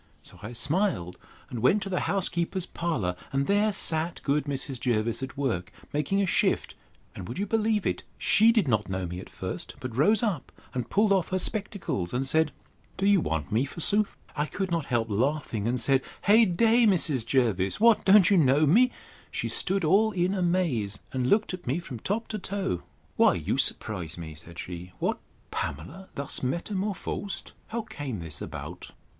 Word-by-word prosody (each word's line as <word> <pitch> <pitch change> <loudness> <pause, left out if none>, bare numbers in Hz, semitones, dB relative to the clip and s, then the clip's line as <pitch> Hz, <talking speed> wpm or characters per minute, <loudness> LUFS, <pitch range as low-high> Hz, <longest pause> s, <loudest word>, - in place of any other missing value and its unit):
So - - -14
I 110 +3 -7
smiled, 145 - 0 0.3
and 120 - -4
went 195 - +4
to 195 - -5
the 180 - 0
housekeeper's 180 -1 0
parlour; 140 - -2 0.2
and 135 0 +1
there 205 +4 +3
sat 165 -3 0
good 145 +1 +1
Mrs. 135 -2 -3
Jervis 115 -1 0
at 130 +1 -6
work, 110 -11 -1 0.2
making 150 +7 +1
a - - +2
shift: 185 - +2 0.4
and, 90 - -7
would 120 - -6
you 200 - 0
believe 215 -1 +1
it? - - 0 0.2
she 225 +2 +5
did 220 -8 +2
not 110 -5 +1
know 95 -1 -2
me 90 +1 -5
at - - -10
first; - - -6
but 125 -3 -6
rose 205 - +3
up, 185 - -1 0.2
and 125 -2 -3
pulled 205 0 +3
off 190 -4 +2
her 185 - 0
spectacles; 190 - -2
and 135 +2 0
said, 160 +2 +3 0.5
Do 195 - 0
you 200 -3 +5
want 80 - -2
me, 110 +5 +2
forsooth? 200 +8 0 0.2
I 150 0 0
could 190 +1 -3
not 165 -4 0
help 120 -4 0
laughing, 115 -1 -1
and 125 +1 0
said, 135 +3 +3 0.2
Hey 220 +3 +6
day! 225 +5 +4
Mrs. 155 - +3
Jervis, 110 -7 +1
what! 230 0 +5
don't 200 -1 +6
you 195 - +6
know 145 -1 +4
me?—She 240 - 0
stood 195 0 0
all 205 +7 +4
in 180 0 +1
amaze, 170 - 0 0.2
and 130 -1 0
looked 210 -2 +2
at 180 -5 -7
me 130 +5 +1
from 135 -9 -7
top 210 - -2
to 215 - -3
toe: 185 - -2 0.4
Why, - - +5
you - - -1
surprise 90 -7 -2
me, 80 -2 -7
said 80 +2 -13
she: 90 0 -7
What! - - -1 0.3
Pamela 170 - -5
thus 140 0 -2
metamorphosed! 190 +5 -3 0.2
How 230 0 -3
came 145 - -5
this 80 -4 -4
about? - - -7
155 Hz, 185 wpm, -27 LUFS, 120-195 Hz, 0.5 s, Hey